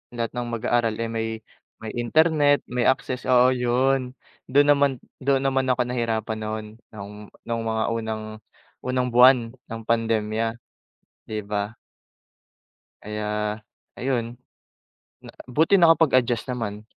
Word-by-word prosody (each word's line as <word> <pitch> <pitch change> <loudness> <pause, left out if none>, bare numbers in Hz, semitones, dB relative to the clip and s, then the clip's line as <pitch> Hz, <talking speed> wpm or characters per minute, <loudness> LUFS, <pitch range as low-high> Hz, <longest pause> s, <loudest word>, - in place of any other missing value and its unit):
lahat 115 -1 -2
ng 120 -1 -3
mag-aaral, 115 -1 0
eh, 115 0 -2
may 115 0 -2 0.5
may 110 -1 -6
internet, 145 +3 +3
may 125 -1 -1
access, 130 -1 -1
oo, 125 0 +6
'yon, 125 +1 +1 0.4
do'n 145 +2 +5
naman 140 -1 +2 0.3
do'n 135 0 +2
naman 135 -1 +1
ako 125 - 0
nahirapan 115 -3 -2
no'n, 110 0 -4 0.3
noong, 105 +1 -9 0.2
no'ng 115 -1 -2
mga 110 0 0
unang 110 -1 -3 0.6
unang 125 0 0
buwan 125 +1 +7 0.2
ng 115 -3 -9
pandemya, 115 0 0 0.7
'di 110 -1 -4
ba? 105 +1 -2 1.3
Kaya, 105 0 -3 0.4
ayun. 120 -2 -2 0.8
Na - - -12 0.2
buti 160 +10 +3
nakapag-adjust 140 - +3
naman. 110 -4 -4
120 Hz, 120 wpm, -24 LUFS, 110-130 Hz, 1.3 s, buwan